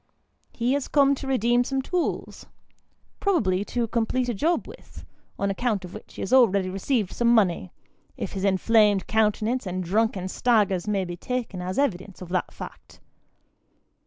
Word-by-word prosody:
He 245 +2 0
has 285 -1 -1
come 280 -1 +4
to 275 0 -5
redeem 245 -1 +2
some 270 +2 -2
tools: 355 +4 -3 0.7
probably 200 - +1
to 240 +1 -1
complete 240 +3 0
a - - 0
job 325 - 0
with, - - -13 0.3
on 200 0 0
account 210 -2 -1
of 180 - -11
which - - -11
he - - -5
has 195 - -3
already 200 -7 +4
received 200 +1 -1
some 240 - 0
money, 190 - +3 0.5
if - - -4
his 195 - -4
inflamed 205 +1 +3
countenance 220 +2 +1
and 185 0 -3
drunken 195 0 0
stagger, 205 -3 +2
may 200 -3 0
be 175 -1 -6
taken 235 -3 -4
as 185 +1 -4
evidence 195 -8 -1
of 180 - -9
the 180 -1 +1
fact. - - -11
215 Hz, 160 wpm, -25 LUFS, 190-245 Hz, 0.7 s, come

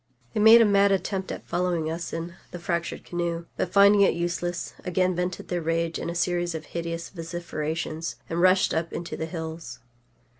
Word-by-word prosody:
They 220 - -1
made 220 +2 +9
a - - +6
mad 200 -1 +4
attempt 195 0 -1
at - - -7
following 175 -3 0
us 170 +2 -4
in 165 +1 -4 0.2
the - - -7
fractured 170 0 -3
canoe, 170 -1 -2
but, 180 - -2
finding 200 +1 +6
it 195 - +4
useless, 175 +1 -2
again 185 -1 +1
vented 180 0 -3
their 175 -1 -1
rage 165 +1 -1
in - - -3
a 170 - -4
series 175 -1 0
of 160 - -6
hideous 170 0 -4
vociferations, 165 -2 -4
and 170 +1 -1
rushed 185 +1 +4
up 160 +1 -1
into 170 - -4
the 160 - -4
hills. 160 -1 -6
175 Hz, 185 wpm, -26 LUFS, 165-185 Hz, 0.2 s, made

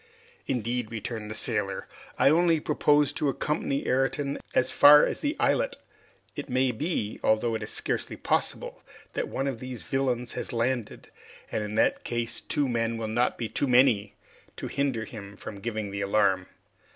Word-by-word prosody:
"Indeed," 120 -2 -1
returned 110 -1 -5
the 110 - -5
sailor, - - -1 0.3
"I 140 - +5
only 165 0 +4
propose 150 -1 +2
to 145 - 0
accompany 140 0 -1
Ayrton 140 +2 0 0.2
as 130 - +3
far 150 +1 +8
as - - -3
the 295 +1 -1
islet. - - +2 0.6
It - - -6
may 130 0 +2
be, 120 -4 -2
although 110 +2 +2
it 110 - -2
is 105 - -5
scarcely - - -3
possible, - - -1 0.3
that - - -2
one 135 - -2
of 135 -5 -2
these 130 -1 -7
villains 125 -3 -1
has - - -5
landed, 120 -1 -2 0.4
and 105 - -1
in 105 0 -5
that 110 - +2
case 120 -1 -2
two 145 -2 0
men 115 -1 0
will 115 -1 -3
not 120 +3 +1
be 115 - -2
too 140 - -1
many 120 -5 +4 0.4
to - - -5
hinder 135 -5 -1
him 100 -2 -10
from 100 -1 -8
giving 110 -3 -3
the 100 0 -3
alarm. 100 -2 +2
120 Hz, 170 wpm, -27 LUFS, 110-140 Hz, 0.6 s, far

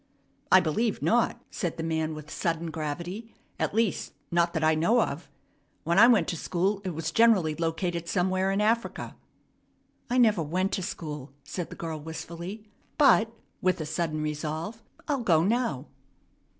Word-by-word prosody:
"I 185 - +9
believe 205 +7 0
not," 240 0 +2
said 175 -5 -3
the 165 - -3
man 160 -1 -1
with 155 0 -10
sudden 165 -1 -2
gravity; 175 +9 -5 0.2
"at - - -1
least, 225 -3 0 0.2
not 170 0 +2
that 160 -2 -1
I 155 0 +5
know 170 +10 +3
of. 165 -6 -2 0.5
When 170 +4 +2
I 235 - +9
went 240 -4 +4
to 175 - -2
school, 190 +5 -1
it 185 -4 -4
was 165 - -3
generally 215 -9 +4
located 170 +1 -2
somewhere 185 +2 +1
in 195 +1 +1
Africa." 230 +2 0 0.9
"I 250 - +1
never 215 -7 +4
went 185 +6 0
to 190 - -1
school," 150 -6 -6
said 175 +4 -5
the - - -8
girl 160 -2 -5
wistfully; 170 +6 -7 0.3
"but 235 -6 +5 0.2
" - - -42
with 185 -1 +2
a 155 - -3
sudden 155 0 -2
resolve 155 +8 -4 0.3
"I'll 280 -3 0
go 165 -8 +4
now." 220 - 0
175 Hz, 165 wpm, -28 LUFS, 160-210 Hz, 0.9 s, I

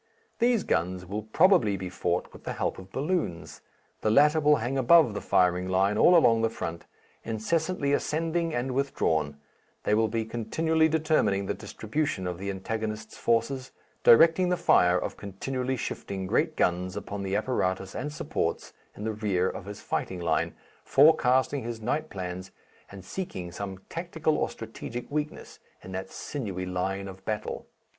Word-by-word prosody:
These 240 -3 +3
guns 90 +2 -1
will 100 +4 -4
probably 110 - +3
be 95 0 -5
fought 90 0 -2
with - - -13
the - - -4
help - - -2
of 95 0 -12
balloons. 145 - -2 0.4
The 110 - +1
latter 150 +7 +5
will 150 0 +5
hang 125 +1 -2
above 135 -1 +5
the 105 - -4
firing 90 0 +2
line 95 +2 +2
all 175 +11 +6
along 115 -8 +5
the 115 - +2
front, 85 -5 -6 0.4
incessantly 145 +7 -1
ascending 165 +3 0
and 125 -1 -2
withdrawn; 80 - 0 0.5
they - - +1
will 110 +1 +3
be 110 +1 -2
continually 160 +9 +1
determining 155 -11 +1
the - - -1
distribution 145 -11 -3
of 90 -1 -4
the 100 +1 -4
antagonist's 110 +3 -4
forces, 130 +3 0 0.3
directing 165 +8 +6
the 180 - +1
fire 90 - +4
of - - -4
continually 130 +6 -3
shifting 95 -4 -4
great - - +1
guns 90 +1 0
upon 100 -1 -5
the 95 0 -2
apparatus 95 -4 -1
and 150 - -4
supports 150 - -3 0.2
in 105 - -6
the 110 0 -1
rear 100 -4 0
of 95 - -5
his 100 0 -8
fighting 95 - -3
line, 85 -2 0 0.3
forecasting 135 -2 +4
his 115 -1 -5
night 150 +8 -2
plans 95 -1 -6 0.4
and 95 -2 -10
seeking 95 - -5
some 95 +1 -5
tactical 165 -2 -1
or - - 0
strategic 115 +2 -7
weakness 150 0 -4 0.2
in 95 - -9
that 95 0 -5
sinewy 100 -10 -5
line 95 +2 -2
of 95 0 -10
battle. 105 +1 -4
110 Hz, 160 wpm, -28 LUFS, 95-145 Hz, 0.5 s, all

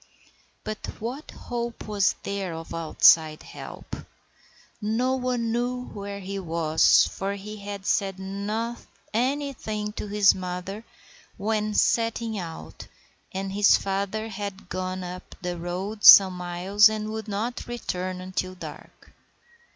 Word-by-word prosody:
But 215 0 -5
what 250 +7 -5
hope 235 -1 -5
was 205 -2 +2
there 195 -4 -3
of 165 0 -8
outside 160 -1 +4
help? - - -9 0.9
No 230 +5 +1
one 250 -3 -1
knew 250 +1 -2
where 200 0 -6
he 195 +1 -5
was, 165 -3 +4
for 195 +1 -3
he 210 +2 -8
had 200 -1 -7 0.3
not 205 +5 -3
said - - -21 0.3
anything 240 -4 -1
to 210 - -5
his 205 -1 +5
mother 185 +3 -5 0.5
when 215 +1 -1
setting 230 -1 +1
out, 160 - -8 0.4
and 195 0 -4
his 205 0 +6
father 200 +3 -2
had 200 -1 -6
gone 185 0 -3
up 180 +1 -8
the 180 -1 -3
road 185 +5 -5
some 190 -2 +11
miles 180 +4 +4
and 215 0 -3
would 220 0 -5
not 215 +4 -3
return 185 -6 -4
until 185 0 -3
dark. - - -11
200 Hz, 130 wpm, -26 LUFS, 185-220 Hz, 0.9 s, some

